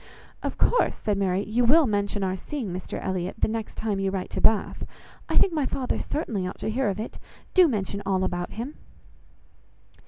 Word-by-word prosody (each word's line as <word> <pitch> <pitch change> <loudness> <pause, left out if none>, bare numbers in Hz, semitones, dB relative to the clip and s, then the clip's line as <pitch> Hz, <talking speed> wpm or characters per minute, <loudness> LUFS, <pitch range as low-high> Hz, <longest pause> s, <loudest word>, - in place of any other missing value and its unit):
"Of - - -3
course," - - +3
said 205 -3 -1
Mary, 190 0 +1
"you 230 +4 +1
will 300 +6 +6
mention 205 -2 0
our 185 0 0
seeing 225 - -4
Mr 185 0 -5
Elliot, 185 -1 -2
the - - +2
next 220 0 -4
time 210 -3 -1
you 195 0 +1
write 190 -1 -3
to - - -2
Bath. 220 -2 +3 0.5
I - - +1
think 380 - +5
my 295 -4 +1
father 260 -2 -1
certainly 215 - -2
ought - - -6
to - - -1
hear 245 -1 +1
of 195 +1 -3
it; 220 - -5 0.3
do 365 -2 +7
mention 200 - -2
all 190 -1 +1
about 175 -1 -2
him." 240 +7 -5
210 Hz, 195 wpm, -26 LUFS, 190-245 Hz, 0.5 s, do